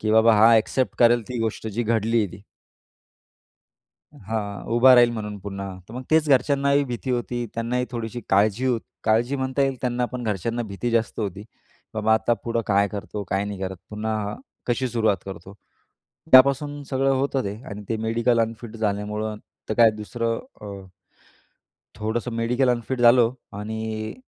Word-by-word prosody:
की 110 - -1
बाबा 110 0 +6
हा 115 +2 +7
एक्सेप्ट 130 +4 0
करेल 120 0 +5
ती 125 - -4
गोष्ट, 110 0 -3
जी 115 +3 -2
घडली 115 +1 +1
आहे 105 - +2
ती. 100 - -12 1.7
हां. 100 -1 -5
उभा 130 +2 +7
राहील, 120 -1 +6
म्हणून 105 -2 -5
पुन्हा. 100 0 -6 0.2
तर 110 - -10
मग 130 - -5
तेच 155 -1 +3
घरच्यांनाही 140 +1 +3
भीती 125 +1 -4
होती, 120 -1 -2
त्यांनाही 125 +2 -1
थोडीशी 120 0 -5
काळजी 105 +5 +2
हो 120 -3 +2 0.3
काळजी 120 +5 +2
म्हणता 130 +1 0
येईल, 135 -1 0
त्यांना 125 -1 0
पण. 125 -1 -4
घरच्यांना 115 +3 -2
भीती 110 +3 -4
जास्त 115 0 0
होती. 100 -1 -4 0.5
बाबा, 110 0 +3
आता 115 +2 +1
पुढं 115 0 0
काय 100 0 +3
करतो, 105 +1 -5
काय 95 +1 0
नाही 105 -1 -5
करत, 95 -1 -4
पुन्हा 105 -1 -3 0.3
कशी 125 +1 0
सुरुवात 110 -4 +1
करतो? 95 0 -9 0.8
त्यापासून 140 +2 +5
सगळं 135 +1 +1
होतं 135 0 0
ते. 100 0 -3 0.2
आणि 105 +1 -7
ते 115 - 0
मेडिकल 115 +1 +2
अनफिट 115 0 -4
झाल्यामुळं, 105 0 -2 0.3
तर 110 - -1
काय, 115 -1 +6
दुसरं 115 +2 -3 0.2
अ, 100 -2 -8 1.1
थोडंसं 115 +3 -3
मेडिकल 125 +3 +1
अनफिट 120 +1 -2
झालो 120 0 +6 0.3
आणि 110 0 -4
115 Hz, 160 wpm, -24 LUFS, 105-125 Hz, 1.7 s, हा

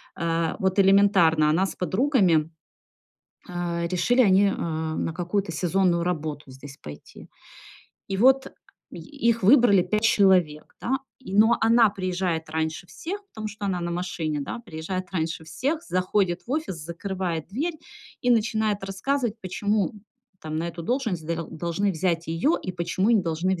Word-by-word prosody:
А, 165 -1 -1
вот 190 +1 +1
элементарно, 190 -6 +5
она 175 +5 +2
с - - -6
подругами 185 - +2 1.0
э, 170 -1 -2
решили 185 +9 +2
они, 200 -2 +5
а, 160 -4 -2
на 165 - -2
какую-то 180 +2 -2
сезонную 175 +1 +1
работу 155 -5 -4
здесь 135 +1 -12
пойти. 75 -1 -12 0.8
И 195 - -2
вот 265 +5 +4 0.4
и - - -9 0.3
их 230 -2 +2
выбрали 220 -4 +6
5 215 +4 -1
человек, 185 -8 +3
да. 265 - 0 0.2
И, 195 -7 -8
но 220 +3 +5
она 230 0 +5
приезжает 180 -4 -2
раньше 160 +2 -3
всех, 370 - -6
потому 220 - -7
что 205 0 -6
она 185 -2 -1
на 175 0 -3
машине, 170 -4 -3
да. 140 - -5
Приезжает 185 -3 -5
раньше 160 -2 -2
всех, 275 - -2
заходит 185 0 0
в - - -10
офис, 305 - -2
закрывает 170 +1 -4
дверь. 300 - -2 0.5
И 245 - +2
начинает 220 -3 +1
рассказывать, 225 +4 -1
почему, 205 +3 -1 0.5
там, 155 0 -5
на 165 - -2
эту 170 0 -7
должность 225 - -2
дел 165 0 -3
должны 170 +5 -1
взять 170 0 -1
её 165 - +1
и 185 - -5
почему 175 +4 0
не 220 -4 +4
должны 170 +3 0
вз 175 - -7
185 Hz, 155 wpm, -25 LUFS, 165-210 Hz, 1.0 s, выбрали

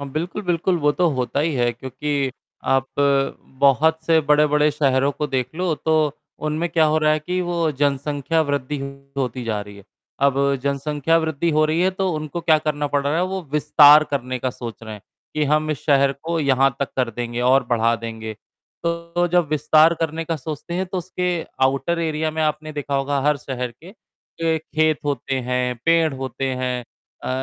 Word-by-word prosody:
हाँ, 140 - -5
बिल्कुल, 175 +7 -3
बिल्कुल 175 0 0
वो 150 0 +3
तो 175 +3 +2
होता 130 +2 -1
ही 155 0 0
है, 120 -2 +2
क्योंकि 135 +3 -3 0.3
आप 135 0 +2 0.7
बहुत 155 +4 +4
से 165 -1 +4
बड़े-बड़े 150 0 +4
शहरों 140 -2 +2
को 150 +2 -3
देख 130 0 -2
लो, 180 -1 0
तो 155 -1 +1 0.3
उनमें 155 +3 -1
क्या 160 -1 +3
हो 155 +1 +2
रहा 155 0 +3
है 155 - +1
कि 180 +4 -2
वो 170 -2 0
जनसंख्या 145 +2 0
वृद्धि 145 -1 -2 0.4
होती 125 -2 -2
जा 110 -2 -2
रही 105 0 -10
है। 100 - -14 0.4
अब 140 -1 +4 0.3
जनसंख्या 145 +3 0
वृद्धि 160 0 -1
हो 155 0 +3
रही 155 +2 +1
है, 185 +1 +3
तो 190 0 -1
उनको 155 +2 -4
क्या 160 -2 +4
करना 150 -1 -2
पड़ 145 0 0
रहा 145 +3 +1
है? 175 - +2
वो 190 0 -3
विस्तार 150 0 +7
करने 130 -2 -2
का 130 +1 -2
सोच 115 -2 -8
रहे 110 -1 -7
हैं 105 - -13 0.3
कि 155 0 +1
हम 155 +2 +1
इस 150 - -4
शहर 140 -1 +4
को 165 +1 -2
यहाँ 135 -2 +3
तक 140 - -1
कर 125 -3 +1
देंगे 120 +1 -4
और 130 +2 +4
बढ़ा 115 -1 +2
देंगे, 110 -1 -6 0.5
तो 170 +1 -1
जब 175 -3 +3
विस्तार 155 +2 +4
करने 165 0 -2
का 165 0 -2
सोचते 155 +3 -6
हैं, 185 +2 -1
तो 185 +1 -3
उसके 180 -1 -2 0.2
आउटर 140 +6 0
एरिया 160 -1 -1
में 160 0 -2
आपने 155 0 -2
देखा 145 -1 -4
होगा 140 +1 0
हर 150 0 +3
शहर 125 -2 -5
के 185 - -11 0.7
खेत 155 -1 0
होते 140 -1 -2
हैं, 125 0 -1
पेड़ 165 -2 +3
होते 130 0 -4
हैं, 125 -1 -2 0.4
अ, - - -3
150 Hz, 195 wpm, -21 LUFS, 135-160 Hz, 0.7 s, विस्तार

